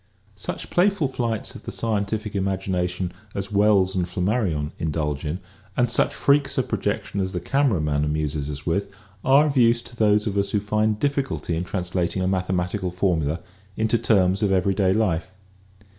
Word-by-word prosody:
Such 105 - -6
playful 180 -5 +2
flights 115 -4 -2
of - - -10
the - - -4
scientific 105 -1 -2
imagination 95 -2 -1 0.2
as 100 +1 -3
Wells 100 -2 +3
and 90 -2 0
Flammarion 90 -5 0
indulge 75 -3 -2
in 75 +4 -2 0.4
and 125 -1 +2
such - - +2
freaks 140 0 +2
of - - +1
projection 100 - -2
as 95 0 -1
the 90 - -1
camera 135 - +1
man 75 -1 0
amuses 75 -1 -1
us 70 -2 -6
with 100 +4 0 0.3
are 140 +3 +6
of 150 -2 -1
use 120 -1 +4
to 120 - -10
those 105 -2 +3
of 100 -1 0
us 100 0 0
who 105 - +3
find 105 +1 0
difficulty 135 - -1
in 85 +2 -2
translating 90 -1 -1
a - - +1
mathematical 90 0 -1
formula 85 -4 0 0.4
into 110 +1 +2
terms 100 -4 +3
of 105 -2 +2
everyday 95 0 +2
life. 95 -3 0
95 Hz, 170 wpm, -24 LUFS, 90-110 Hz, 0.4 s, are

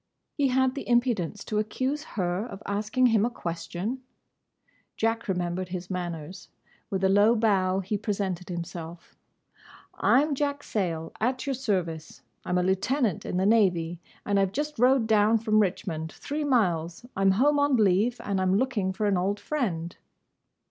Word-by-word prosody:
He 285 -2 +1
had 260 0 +2
the 275 - -6
impudence 230 -6 +1
to 210 - -1
accuse 260 +7 -2
her 180 +1 0
of 210 -4 -9
asking 210 +5 0
him 215 -2 +4
a 235 - +2
question! 185 +4 -4 1.0
Jack 225 +1 0
remembered 180 -1 -2
his 180 0 -6
manners. 175 -1 -5 0.4
With 195 -1 -2
a - - +5
low 205 +4 +5
bow 195 -4 +2
he 200 +2 -2
presented 190 -4 -3
himself. 170 -1 -7 0.8
"I 265 +3 +4
'm 300 -1 -1
Jack 285 +1 -1
Sayle, 165 -6 -2
at 255 +4 0
your 275 - 0
service. 185 -11 -3 0.2
I - - -8
'm 180 - +2
a 180 - +2
lieutenant 200 - 0
in - - -2
the 190 - +1
Navy; 180 -6 +2 0.3
and 200 -1 +2
I 195 - +4
've - - -10
just 295 +2 -3
rowed 255 -1 +4
down 220 0 +4
from 215 -1 +2
Richmond—three 190 - -2
miles. 175 - 0
I 195 - -2
'm 195 - +5
home 290 +8 +3
on 285 -1 +3
leave; 215 +3 +2
and 200 -2 -1
I - - +1
'm 185 0 +2
looking 210 -7 0
for 215 +2 -2
an 200 -2 +2
old 195 +3 0
friend." 180 - -2
205 Hz, 170 wpm, -27 LUFS, 180-245 Hz, 1.0 s, a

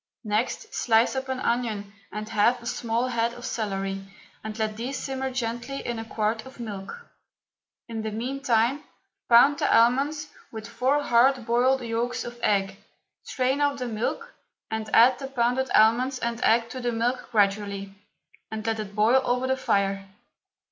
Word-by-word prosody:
Next, 215 +3 -2
slice 230 +2 +2
up 265 0 -3
an 260 -1 -2
onion 220 -5 -2 0.2
and 215 0 -5
half 225 +3 +2
a 235 - -14
small 235 +1 -1
head 235 -1 0
of 240 0 -9
celery, 195 -4 -3 0.4
and 215 0 -6
let 215 -1 -1
these 245 +5 -4
simmer 265 -1 -3
gently 245 +2 -4
in 240 -1 -3
a 225 - -6
quart 220 0 -1
of 265 -1 -14
milk. 215 - -7 0.8
In 225 -2 -4
the 220 - -3
meantime 250 +3 0 0.5
pound 275 +5 +6
the - - +1
almonds 280 +6 +3 0.2
with 220 -1 -7
four 280 +3 +1
hard 245 0 +3
boiled 255 +3 +2
yolks 240 +2 -2
of 240 0 -8
egg, 195 -2 +1 0.4
strain 265 +2 -1
off 285 -1 +2
the 250 -2 -3
milk 240 - -3 0.4
and 220 0 -3
add 245 +3 +6
the 270 - -5
pounded 255 0 0
almonds 245 +5 +4
and 235 -1 -3
egg 230 +1 +3
to 255 - -6
the 240 0 0
milk 240 +2 -1
gradually, 200 -2 0 0.6
and 220 0 -5
let 225 -1 -1
it 205 -2 -6
boil 225 +5 +4
over 250 +1 0
the 260 0 +1
fire. 195 -5 0
235 Hz, 165 wpm, -26 LUFS, 220-260 Hz, 0.8 s, pound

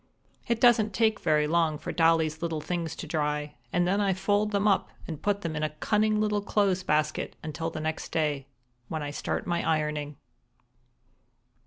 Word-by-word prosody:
It 235 -1 +1
doesn't 220 -5 +4
take 220 -1 +2
very 150 -1 +2
long 160 -1 +2
for 150 - -5
Dolly's 160 -1 +2
little 165 -2 -1
things 165 0 -3
to - - -6
dry, 150 -1 -1 0.2
and 175 0 +2
then 200 +3 +2
I 195 -2 +2
fold 205 +2 +1
them 205 0 +1
up 195 -2 +2 0.2
and 155 -3 -6
put 200 -1 0
them 165 -3 -3
in 150 - -2
a 155 - +1
cunning 210 +7 +1
little 210 -1 +1
clothes 200 -2 +1
basket 155 -2 0
until 160 +1 -3
the 155 - -6
next 155 0 -3
day, 145 -4 0 0.4
when 160 -2 -3
I 145 - -4
start - - -3
my 170 -1 0
ironing. 150 -2 -1
165 Hz, 180 wpm, -28 LUFS, 155-200 Hz, 0.4 s, doesn't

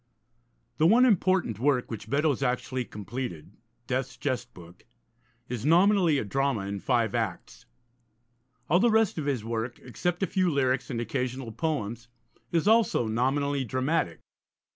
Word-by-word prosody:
The 160 - +5
one 240 +7 +6
important 185 - +2
work 130 -2 +1
which 110 -1 -7
Beddoes 145 0 +1
actually 125 0 -1
completed, 105 -6 -6 0.3
Death's 130 -1 -3
Jest 130 -6 -3
Book, 90 0 -15 0.6
is 120 -3 -4
nominally 175 +1 +4
a 125 - -2
drama 135 +1 0
in 100 +1 -4
five 120 0 +1
acts. 110 -7 -4 1.0
All 175 +4 +4
the 235 +4 +4
rest 220 -6 +2
of 145 - -3
his 125 -6 -1
work, 115 +1 -3
except 175 - -2
a - - +4
few 185 -1 +1
lyrics 135 -3 0
and 120 -4 -3
occasional 125 +1 -3
poems, 115 -4 -3 0.4
is 165 +2 +1
also 220 - +4
nominally 135 +5 0
dramatic. 130 - -1
130 Hz, 140 wpm, -27 LUFS, 115-160 Hz, 1.0 s, one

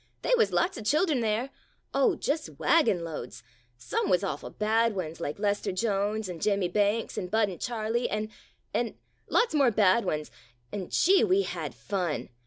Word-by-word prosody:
They - - 0
wuz 455 -2 +3
lots 345 -7 +1
of - - -7
childern 305 - +2
there 230 +4 -1 0.2
— - - -43
oh, 435 -7 +3
just 305 0 -3
wagon 230 - +3
loads 150 -7 -7 0.2
— - - -38
some 120 - -2
wuz 180 +1 +3
awful 195 - -3
bad 220 +1 +1
ones, 165 -4 -5
like 145 - -3
Lester 205 0 0
Jones 205 +1 -1
and 175 -3 -7
Jim 200 -1 +1
mie 180 - 0
Banks 210 +4 0
and 180 - -5
Bud 220 0 +2
V 180 - -7
Charlie, 235 0 -1
an' 215 +1 -2 0.2
— - - -41
an' - - -1 0.2
— - - -41
lots 465 -5 +2
more 280 -4 +4
bad 210 0 +4
ones, 150 0 -3 0.4
and, 190 -3 -5
gee! 380 +2 +4
we 385 +2 +3
had - - -5
fun. 180 -6 -3
215 Hz, 195 wpm, -28 LUFS, 185-245 Hz, 0.4 s, more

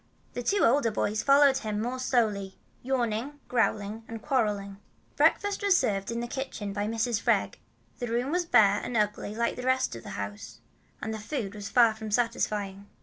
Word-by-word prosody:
The 245 - -3
two 400 +11 +1
older 240 0 +3
boys 215 0 -1
followed 275 0 +5
him 215 -4 -3
more 245 +4 -2
slowly, 210 -7 0 0.2
yawning, 250 +2 -2
growling, 220 -2 0
and 225 0 -6
quarreling. 210 -6 -1 0.4
Breakfast 410 0 +2
was 400 -3 +4
served 200 - 0
in 235 0 -2
the 240 - -3
kitchen 235 -6 -5
by 205 +1 -2
Mrs. 225 0 -1
Freg. - - +1 0.4
The 245 - -3
room 240 +4 -1
was 355 +1 +1
bare 205 -7 +5
and 240 - -2
ugly 210 0 -1
like 235 +1 -1
the - - -4
rest 260 - +1
of 115 - -8
the - - -10
house, 100 0 -6 0.5
and 220 - -2
the 220 - -5
food 210 -3 -4
was 205 -2 -7
far 235 -3 +5
from 220 0 -7
satisfying. 210 -3 -1
225 Hz, 185 wpm, -28 LUFS, 205-255 Hz, 0.5 s, followed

